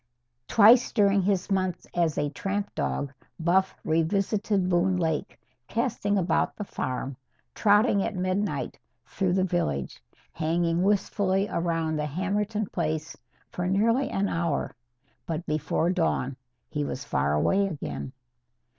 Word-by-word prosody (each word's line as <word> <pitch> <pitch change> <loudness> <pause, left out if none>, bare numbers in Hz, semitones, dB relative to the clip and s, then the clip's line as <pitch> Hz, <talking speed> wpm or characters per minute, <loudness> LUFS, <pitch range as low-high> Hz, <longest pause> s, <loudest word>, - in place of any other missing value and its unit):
Twice 230 +3 +6
during 200 -3 +3
his 190 0 0
months 185 -2 0
as 170 -3 +1
a 145 -1 0
tramp 200 +5 -3
dog, 140 -1 -2 0.3
Buff 185 +3 +2
revisited 195 +4 +1
Boone 185 +1 +2
Lake 160 -3 -2 0.3
casting 225 -4 0
about 175 -3 +1
the 210 - -4
farm, 130 -7 -4 0.4
trotting 205 -1 +4
at 210 - -2
midnight 185 +3 -2 0.3
through 185 -2 -1
the 185 0 +2
village, 75 - -1 0.3
hanging 165 +1 0
wistfully 195 0 +1
around 165 -2 -1
the 150 0 -1
Hammerton 205 +6 -1
place 160 -3 -3 0.4
for 180 0 -2
nearly 230 +8 +2
an 200 +1 0
hour. 165 -5 -1 0.5
But 165 0 -3
before 155 +2 0
dawn 160 -7 0 0.3
he 150 -1 -2
was 140 -1 -4
far 70 - 0
away 190 - +2
again. 150 -6 -5
185 Hz, 130 wpm, -27 LUFS, 160-200 Hz, 0.5 s, Twice